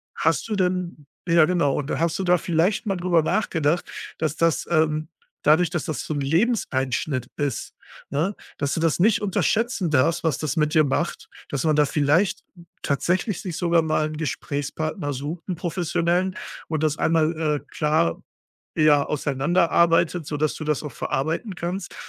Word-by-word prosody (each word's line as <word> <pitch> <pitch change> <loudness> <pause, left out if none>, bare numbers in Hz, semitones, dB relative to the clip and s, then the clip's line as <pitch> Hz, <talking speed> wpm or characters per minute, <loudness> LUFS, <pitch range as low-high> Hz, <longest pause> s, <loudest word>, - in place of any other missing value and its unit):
hast - - +1
du 215 - -2
denn 180 -5 -1 0.2
ja, 165 -2 +6
genau, 160 -5 +1
und 145 0 -3
hast 170 +1 0
du 190 - 0
da 180 0 +4
vielleicht 175 +7 0
mal 195 -2 -1
drüber 175 -2 +2
nachgedacht, 170 -4 0 0.3
dass 155 -1 -1
das, 165 -1 +1
ähm 155 -1 +1 0.4
dadurch, 160 +3 +4
dass 175 - -2
das 155 - -3
so - - -3
'n 145 - -1
Lebenseinschnitt 140 - 0
ist, 145 -5 -3 0.4
ne, 170 +8 0 0.2
dass 145 -1 0
du - - -1
das 165 0 +1
nicht 215 +3 +4
unterschätzen 210 -2 0
darfst, 155 +5 +2
was 155 -7 0
das 150 -3 -2
mit 150 0 +1
dir 155 - +6
macht? 150 +4 -2 0.2
Dass 140 - -2
man 155 -1 +3
da 150 0 +4
vielleicht 150 +7 +1 0.4
tatsächlich 180 +7 0
sich 175 -4 -5
sogar 170 -1 +3
mal 155 -1 +1
'n 155 - -7
Gesprächspartner 145 +1 -3
sucht, 150 +6 -6
'n 180 - -1
professionellen, 175 +2 0 0.3
und 155 -1 -2
das 155 0 +1
einmal, 160 0 +2
äh, 150 -2 +1 0.2
klar, 150 - +1 0.6
ja, 150 -2 +5
auseinanderarbeitet, 165 +3 +2
sodass 150 0 -1
du 155 - -6
das 150 -1 0
auch 150 - -6
verarbeiten 165 - -2
kannst, 175 +2 -4
160 Hz, 165 wpm, -24 LUFS, 150-175 Hz, 0.6 s, ja